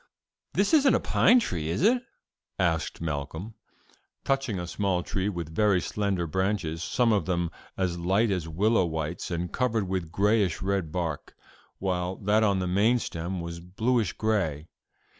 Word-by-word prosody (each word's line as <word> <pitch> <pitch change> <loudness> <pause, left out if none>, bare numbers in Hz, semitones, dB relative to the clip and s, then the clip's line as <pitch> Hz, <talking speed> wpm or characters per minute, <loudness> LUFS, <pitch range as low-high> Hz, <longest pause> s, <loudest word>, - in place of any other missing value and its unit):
"This - - +2
isn't 285 -4 +6
a - - +3
pine 245 +2 +4
tree, 80 - -2
is 85 - -1
it?" 240 +4 +4 0.6
asked 85 -4 0
Malcolm, 80 +6 -4 0.7
touching 135 -8 0
a 90 - -3
small 90 0 -1
tree 95 +2 -1
with 85 -5 -5
very 100 0 +3
slender 100 -3 -1
branches, 95 -2 -1
some 115 +9 +2
of 100 - 0
them 85 -2 0 0.3
as 95 -2 0
slight 95 +6 +1
as 90 -4 -1
willow 95 +4 +2
withes 80 +1 -3
and 85 0 -3
covered 115 -6 0
with 90 -3 -3
grayish 100 -2 +2
red 95 -4 -1
bark, 80 -3 -3 0.4
while 90 -1 -1
that 105 +3 +2
on 100 -3 +3
the 90 -1 -1
main 105 +7 +3
stem 85 -4 -4
was 85 0 -6
bluish 110 +3 0
gray. 90 -9 -1
95 Hz, 160 wpm, -27 LUFS, 85-105 Hz, 0.7 s, isn't